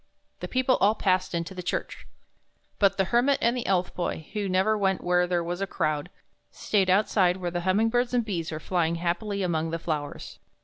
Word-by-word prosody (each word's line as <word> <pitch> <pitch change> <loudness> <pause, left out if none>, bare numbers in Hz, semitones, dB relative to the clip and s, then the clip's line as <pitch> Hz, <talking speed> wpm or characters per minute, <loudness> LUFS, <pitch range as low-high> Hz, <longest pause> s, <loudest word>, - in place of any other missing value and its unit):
The - - -5
people 255 0 +2
all 210 +2 +3
passed 185 -3 0
into 170 +3 -3
the 185 - -6
church. 175 - -4 0.7
But 195 -1 +3
the 195 - +3
Hermit 260 +4 +4
and 235 +1 +2
the 245 - -3
Elf 185 -2 +1
Boy, 170 -3 -3
who 205 -2 -2
never 190 +4 +2
went 195 -2 0
where 180 0 +2
there 175 -1 0
was 175 +2 -4
a 195 - -1
crowd, 155 -2 -1 0.4
stayed 195 -3 0
outside 185 -2 +3
where 175 -2 -3
the 175 0 -2
humming 195 +5 +2
birds 245 +1 +1
and 245 -2 +1
bees 170 -7 -3
were 155 - -4
flying 170 0 0
happily 190 +4 -2
among 165 -2 -1
the 165 - -2
flowers. 150 -3 -5
185 Hz, 205 wpm, -26 LUFS, 175-210 Hz, 0.7 s, Hermit